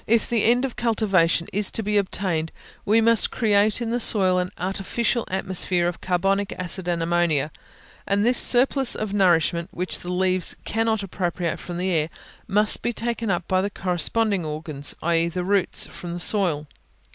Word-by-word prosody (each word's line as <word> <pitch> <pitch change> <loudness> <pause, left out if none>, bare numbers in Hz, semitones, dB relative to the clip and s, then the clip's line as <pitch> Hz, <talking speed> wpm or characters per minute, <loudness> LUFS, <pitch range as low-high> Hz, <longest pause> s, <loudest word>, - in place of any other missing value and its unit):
If 230 0 +2
the 230 -3 0
end 245 +3 +3
of 260 - -5
cultivation 195 -8 +1
is 205 +1 +1
to 225 - -3
be 210 +1 -1
obtained, 185 -5 -1 0.3
we 220 +3 +4
must 230 0 +4
create 210 0 +2
in 230 -1 -2
the 240 - 0
soil 190 -5 +3
an 180 0 -2
artificial 195 +6 -1
atmosphere 185 -2 0
of 175 - -4
carbonic 195 +2 0
acid 185 0 -3
and 170 -1 0
ammonia; 165 -4 +1 0.6
and 200 +1 +1
this 245 +1 +3
surplus 260 +1 +3
of 215 -2 -4
nourishment, 170 -3 +2
which 180 +2 -4
the 175 - -6
leaves 185 0 0
cannot 225 -1 0
appropriate 175 -3 -3
from 175 -1 -7
the 185 +1 -1
air, 160 -2 +1 0.4
must 210 +2 +3
be 240 - -1
taken 230 -1 -3
up 175 -2 -1
by 185 0 +2
the 200 - -1
corresponding 195 +2 0
organs, 150 -2 -2
i.e. 170 0 +2
the 180 +1 -3
roots, 195 0 +1
from 175 -1 -8
the - - -5
soil. 175 -7 +1
190 Hz, 175 wpm, -23 LUFS, 175-215 Hz, 0.6 s, we